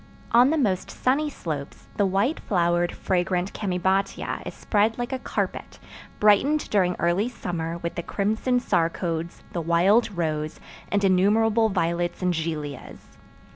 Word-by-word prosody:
On 245 +3 +6
the 320 - +1
most 200 -10 0
sunny 290 +4 0
slopes 150 - -6
the 205 - +3
white 200 - +1
flowered, 175 -2 +1
fragrant 180 0 -1
chamaebatia 190 0 -1
is - - -7
spread 215 +1 +1
like 245 +2 -3
a 260 - -2
carpet, - - -4 0.4
brightened 240 +9 +4
during 180 -3 +2
early 175 +7 +1
summer 170 -7 -4
with 170 0 -4
the - - -3
crimson 220 +7 0
sarcodes, 165 -4 -1
the 170 - -2
wild 185 +8 +3
rose, 155 -2 -2 0.3
and 205 0 +1
innumerable 215 +4 +3
violets 175 -1 -1
and 180 0 +2
gilias. 155 -4 -5
185 Hz, 135 wpm, -25 LUFS, 170-220 Hz, 0.4 s, On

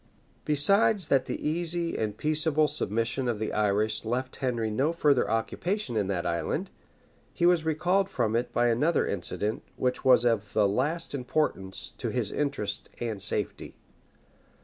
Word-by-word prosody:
Besides 195 +7 +4
that 135 -2 +3
the - - -4
easy 170 +1 -1
and 105 -1 -2
peaceable 155 +1 +2
submission 120 -2 -1
of 120 -3 0
the 110 +1 -3
Irish 105 +1 +1
left 125 +3 -3
Henry 120 -4 -1
no 135 +9 +1
further 145 -10 +2
occupation 155 - -2
in 105 -3 0
that 95 -3 -2
island, 85 -1 -2 0.6
he 170 - 0
was 175 -2 +3
recalled 180 +5 +1
from 115 -3 -1
it 120 +1 -1
by 120 0 +2
another 145 +9 +2
incident, 100 +3 -3
which 125 0 -1
was 125 -2 +5
of 110 -3 0
the 105 -2 +3
last 145 +12 -1
importance 125 -8 -2
to - - -2
his - - -1
interest 140 -9 -3
and 110 -4 -3
safety. 105 -1 0
125 Hz, 150 wpm, -27 LUFS, 110-155 Hz, 0.6 s, was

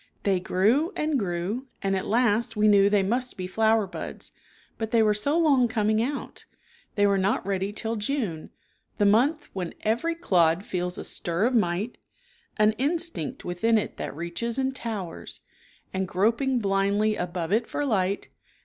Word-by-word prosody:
They 195 -2 +2
grew 220 - +2
and 305 -2 0
grew 195 +7 -3 0.2
and 195 0 +1
at 190 - -3
last 230 0 +2
we 210 0 +4
knew 200 -1 +6
they 205 -1 +3
must 245 +6 -1
be. 185 - -4
flower 220 +3 +2
buds, 185 - -7 0.5
but 220 -1 -2
they 225 -1 +4
were 210 -1 +3
so 285 +10 0
long 280 -7 +4
coming 215 -1 +1
out 275 +4 -4 0.5
They 205 - +3
were 200 -1 +3
not 190 +1 0
ready 195 0 -1
till 225 +2 -3
June, 210 - -3 0.5
the 205 - +2
month 255 +10 +3
when 180 -3 -4
4' - - -32
Every 240 +10 0
clod 180 - +2
feels 180 -1 -2
a - - -5
stir 175 +4 -1
of 255 - +1
might 210 +1 0 0.6
An 215 0 +5
instinct 300 -2 -1
within 220 +6 +2
it 215 - -3
that - - -5
reaches 170 - -3
and 265 0 -1
towers 210 -9 -6 0.5
And 190 0 -1
groping 230 +8 +1
blindly 200 0 +1
above 175 -1 -3
it 225 +2 +2
for 290 - -2
light. 200 -5 0
215 Hz, 170 wpm, -26 LUFS, 190-240 Hz, 0.6 s, knew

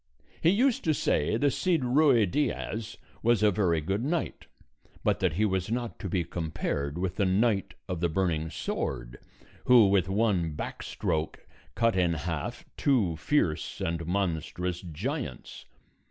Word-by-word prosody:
He 165 - +5
used 240 +6 +2
to 155 -2 +3
say 75 - +1
the 145 +3 +2
Cid 170 +2 +1
Ruy 130 -3 +4
Diaz 115 -1 -2 0.2
was 115 -2 +3
a 105 - +5
very 85 -5 +1
good 95 +8 -1
knight, 160 +3 -2 0.6
but - - +2
that 90 -4 +1
he 105 +6 +2
was 95 -2 -1
not 120 0 -3
to 95 - -4
be 90 -1 0
compared 80 -3 -3
with 95 +1 -2
the 100 - +2
Knight 100 +1 +1
of 90 -3 -3
the 85 0 +1
Burning 80 -2 0
Sword, - - -4 0.5
who 120 -5 +7
with 95 -2 +2
one 95 -6 +1
back - - -5
stroke 80 0 -3 0.3
cut 115 -2 +2
in 90 -2 +2
half 80 -1 -4
two 110 - +2
fierce 85 - 0
and 85 0 -2
monstrous 90 -1 -2
giants. 95 - -5
95 Hz, 155 wpm, -28 LUFS, 85-115 Hz, 0.6 s, who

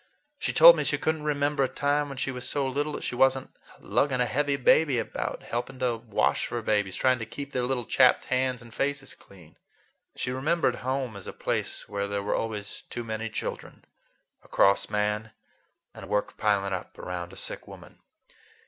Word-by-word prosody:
She - - 0
told - - +10
me - - -1
she - - 0
could 160 0 0
n't 150 - -10
remember 145 -1 +1
a - - +2
time 145 +2 0
when 135 - -7
she 135 - -1
was 125 -1 -5
so 140 -1 0
little 145 +3 -1
that - - -5
she - - -2
was 135 +2 +4
n't 130 - -10 0.2
lugging 135 -3 +1
a 125 - +3
heavy 140 +5 +1
baby 140 +1 +4
about, 115 - -3
helping 125 +3 -4
to 125 -2 0
wash 115 -2 0
for 120 - -3
babies, 105 -3 +1
trying 130 -1 +2
to 115 - -4
keep 140 +4 -7
their 125 -2 -1
little 125 -2 -1
chapped 125 +1 +4
hands 130 -1 0
and 115 -2 -14
faces 140 -1 -2
clean. 90 -5 -18 0.6
She 125 - -2
remembered 135 0 +1
home 130 -3 -2
as 100 - -9
a - - -6
place - - -3
where 100 -1 -2
there 100 0 -2
were 105 - 0
always 105 -3 -4
too 120 - -5
many 110 0 -4
children, - - -6 0.6
a - - -19
cross 100 0 +3
man, 105 +1 -1 0.6
and - - -10
work 105 0 -1
piling 100 -2 +1
up 90 - -6
around 90 -1 -5
a - - -12
sick - - -6
woman. - - -13
125 Hz, 200 wpm, -27 LUFS, 105-140 Hz, 0.6 s, told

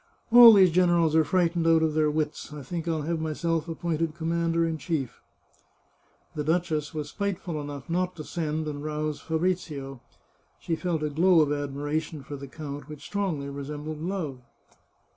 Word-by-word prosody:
All 235 -1 +11
these 190 -4 +6
generals 170 -2 +3
are 160 - +6
frightened 170 -1 +1
out 165 -1 +5
of 160 -1 +1
their 155 -1 +2
wits; 150 0 -3
I 150 -2 -8
think 170 +4 -5
I'll 160 -2 -1
have 165 +2 -1
myself 160 +1 -1
appointed 165 -1 -2
commander 165 0 0
in 160 -1 -2
chief." 150 -8 -3 1.1
The 150 - -3
duchess 160 -2 0
was 150 -2 -5
spiteful 185 -5 -3
enough 145 -3 -7
not 180 +2 -1
to 155 - -7
send 155 -1 -3
and 145 -1 -5
rouse 155 0 -3
Fabrizio. 160 -6 -2 0.6
She 165 - -2
felt 165 -2 -2
a 150 - -1
glow 170 +3 +5
of 145 -1 +2
admiration 145 +1 -3
for 145 - -7
the 140 0 -8
count, 145 0 -8
which 150 -2 -9
strongly 185 -9 -2
resembled 150 +2 -6
love. 165 -7 -3
155 Hz, 165 wpm, -27 LUFS, 150-170 Hz, 1.1 s, All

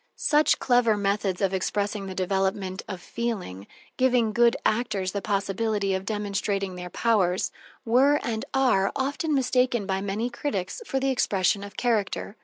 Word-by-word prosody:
Such 300 0 +3
clever 245 -4 +3
methods 200 -2 -1
of 195 -1 +1
expressing 200 +1 -1
the 190 - -6
development 190 0 -1
of 190 -3 -5
feeling, 180 - -4 0.3
giving 245 -4 +2
good 235 +1 +4
actors 210 -5 0
the 200 - -3
possibility 200 0 -1
of 190 0 -2
demonstrating 200 -2 -2
their 180 0 -7
powers, 190 -4 +1 0.3
were, 270 +6 +4
and 220 -2 -2
are, 245 -8 +2
often 285 +3 -1
mistaken 250 -4 +1
by 190 0 -1
many 200 +4 -2
critics 240 - -3
for 270 - 0
the 270 0 +1
expression 200 -5 +1
of 200 -1 -10
character. 220 -3 -1
205 Hz, 150 wpm, -26 LUFS, 195-240 Hz, 0.3 s, good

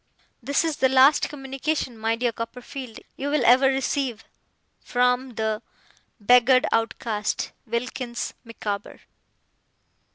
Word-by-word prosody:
'This 280 +6 +1
is 320 -3 -1
the 260 - +3
last 265 +3 +5
communication, 270 -1 -3
my 225 +1 0
dear 240 +1 0
Copperfield, 240 +1 -7 0.2
you 280 +1 -3
will 290 -4 +1
ever 255 +3 +6
receive 265 -3 -1 0.6
'From 250 0 0
'The 220 0 -1 0.6
'Beggared 250 +4 +5
Outcast, 225 -2 -1 0.2
'WILKINS 240 +1 -3
MICAWBER. 210 -3 -6
250 Hz, 105 wpm, -24 LUFS, 230-270 Hz, 0.6 s, ever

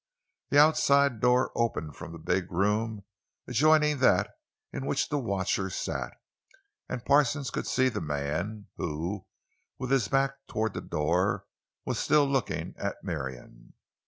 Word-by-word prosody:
The 145 - +2
outside 140 -4 +5
door 125 +2 +3
opened 80 - -1
from - - -8
the 85 - -8
big 90 +3 -1
room 105 +3 0 0.4
adjoining 150 +1 +4
that 100 -8 +3 0.4
in 65 +1 -4
which 75 - 0
the 145 - 0
watcher 95 -4 -1
sat, 90 - -3 0.8
and 120 - -5
Parsons 140 -1 +3
could - - -3
see 130 0 +2
the 125 - -2
man, 80 +8 -3
who, 85 +5 -4 0.5
with 130 0 -4
his 130 -7 +3
back 135 +5 +2
toward 110 -1 -1
the - - -4
door, 85 +5 0 0.4
was - - -2
still 150 -1 +4
looking 135 -2 -1
at - - -2
Marion. 60 -3 -6
110 Hz, 140 wpm, -28 LUFS, 85-135 Hz, 0.8 s, outside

